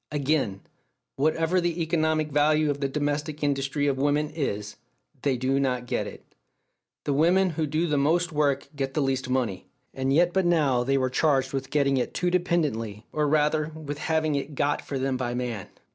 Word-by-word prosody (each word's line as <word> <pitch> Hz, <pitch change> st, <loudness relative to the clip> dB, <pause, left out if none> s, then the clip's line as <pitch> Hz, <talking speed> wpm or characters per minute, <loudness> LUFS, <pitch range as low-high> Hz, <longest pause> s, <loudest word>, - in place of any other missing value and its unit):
Again: 140 Hz, -9 st, 0 dB, 0.5 s
"Whatever 165 Hz, +5 st, +1 dB
the 175 Hz, 0 st, -1 dB
economic 155 Hz, -2 st, 0 dB
value 150 Hz, +1 st, +3 dB
of 145 Hz, -, -4 dB
the 140 Hz, -, 0 dB
domestic 145 Hz, +1 st, -2 dB
industry 140 Hz, 0 st, 0 dB
of 135 Hz, -2 st, 0 dB
women 145 Hz, +2 st, +1 dB
is, 105 Hz, -9 st, -3 dB, 0.5 s
they 135 Hz, -3 st, +1 dB
do 130 Hz, +2 st, +1 dB
not 125 Hz, -3 st, 0 dB
get -, -, -2 dB
it. -, -, -12 dB, 0.7 s
The 145 Hz, -, 0 dB
women 175 Hz, +6 st, +3 dB
who 160 Hz, -1 st, -1 dB
do 155 Hz, +4 st, 0 dB
the 150 Hz, -4 st, +1 dB
most 170 Hz, +5 st, +2 dB
work 145 Hz, -3 st, +1 dB
get 135 Hz, -1 st, -3 dB
the 155 Hz, -, +2 dB
least 130 Hz, -1 st, -1 dB
money." 120 Hz, -8 st, -1 dB, 0.3 s
And 135 Hz, 0 st, -1 dB
yet 175 Hz, +4 st, +3 dB
but 190 Hz, -2 st, +2 dB
now 145 Hz, -8 st, +3 dB
they 135 Hz, +2 st, +1 dB
were 130 Hz, -1 st, 0 dB
charged 135 Hz, -2 st, +2 dB
with 135 Hz, 0 st, -3 dB
"getting 140 Hz, -2 st, +2 dB
it" 125 Hz, -, -2 dB
too 180 Hz, -1 st, 0 dB
dependently, 145 Hz, -, -1 dB
or 150 Hz, -1 st, +1 dB
rather, 150 Hz, +1 st, +2 dB
with 150 Hz, -2 st, -6 dB
having 160 Hz, -1 st, 0 dB
it 140 Hz, +1 st, -3 dB
"got" 145 Hz, +2 st, 0 dB
for 140 Hz, -, -5 dB
them 130 Hz, 0 st, -1 dB
by 120 Hz, -1 st, -2 dB
man! 120 Hz, -6 st, -3 dB
145 Hz, 190 wpm, -26 LUFS, 135-155 Hz, 0.7 s, value